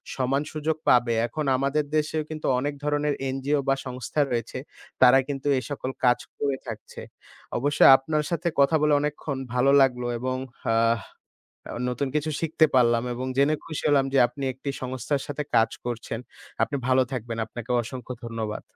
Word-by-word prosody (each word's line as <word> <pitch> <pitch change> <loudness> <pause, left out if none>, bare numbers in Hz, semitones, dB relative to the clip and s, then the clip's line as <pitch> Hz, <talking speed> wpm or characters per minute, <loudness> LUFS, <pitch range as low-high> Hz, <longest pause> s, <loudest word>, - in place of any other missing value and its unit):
সমান 135 +1 0
সুযোগ 155 +1 -2
পাবে। 120 -1 +4
এখন 155 +3 -4
আমাদের 140 +3 +1
দেশেও 155 0 0
কিন্তু 155 -1 -4
অনেক 145 +2 -2
ধরনের 150 0 +1 0.2
এনজিও 135 +2 0
বা 135 - +4
সংস্থা 130 +3 -2
রয়েছে 120 +1 -2 0.4
তারা 130 +1 +8
কিন্তু 140 -1 -4
এ - - -6
সকল 135 -2 -4
কাজ 125 0 +4 0.2
করে 140 -2 -1
থাকছে। 110 -2 -8 0.6
অবশ্যই 145 +4 +5
আপনার 150 +2 -1
সাথে 170 0 -2
কথা 140 +3 +5
বলে 150 -1 +3
অনেকক্ষণ 150 -1 -3 0.2
ভালো 125 +2 +3
লাগলো 125 -2 +2
এবং 130 +1 -2
অ্যা 115 -1 -2 0.9
আবার 120 - -5
নতুন 125 +3 -2
কিছু 150 +1 0
শিখতে 160 -1 +3
পারলাম 120 -2 +4
এবং 125 +2 -4
জেনে 140 +3 +4
খুশি 155 -2 -5
হলাম 140 -2 +4
যে - - +3
আপনি 130 +3 -8
একটি 135 +3 -6
সংস্থার 130 +2 -2
সাথে 145 +1 -3
কাজ 115 - +4 0.2
করছেন। 115 -1 -4 0.4
আপনি 145 - -2
ভালো 130 0 +4
থাকবেন 115 -2 -4
আপনাকেও 120 +2 -4
অসংখ্য 125 +1 -7
ধন্যবাদ। 110 -2 -4
135 Hz, 165 wpm, -25 LUFS, 125-145 Hz, 0.9 s, তারা